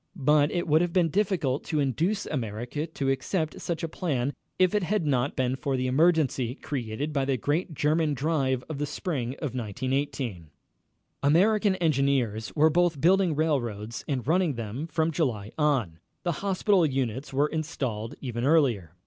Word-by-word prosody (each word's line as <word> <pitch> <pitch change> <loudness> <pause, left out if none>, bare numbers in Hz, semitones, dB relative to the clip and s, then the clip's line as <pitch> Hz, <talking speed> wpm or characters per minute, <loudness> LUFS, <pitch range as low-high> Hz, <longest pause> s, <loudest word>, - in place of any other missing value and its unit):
But 150 -1 +3
it 175 -1 -1
would 155 +1 +4
have 175 -1 -1
been 175 -3 +3
difficult 175 -8 0
to 155 -2 -1
induce 165 - 0
America 125 +3 -3
to 140 -4 -1
accept 155 +4 -2
such 170 -1 -3
a - - 0
plan 145 -6 -2 0.2
if 185 -1 +3
it 210 - +2
had 190 -1 0
not 135 -1 +1
been 130 -2 0
for 135 -1 -2
the 130 - -1
emergency 135 -3 +2
created 140 +1 -4
by 140 -2 +1
the 135 -1 0
great 155 - -1
German 150 +1 +1
drive 135 -3 0
of 155 -3 -5
the 145 - -1
spring 135 - -3
of 145 -4 -4
1918. 125 - -3 0.7
American 195 +7 +3
engineers 135 - +1
were 155 +1 +5
both 175 -2 +2
building 180 +1 +3
railroads 120 -8 -1
and 130 -5 -2
running 165 -1 +2
them 115 +7 -5
from 160 0 0
July 120 -11 -1
on. 130 - 0 0.2
The 175 - +1
hospital 195 -1 +2
units 130 -2 -1
were 140 +2 +2
installed 130 -9 -3
even 120 -3 -3
earlier. 125 - +2
145 Hz, 165 wpm, -27 LUFS, 125-165 Hz, 0.7 s, were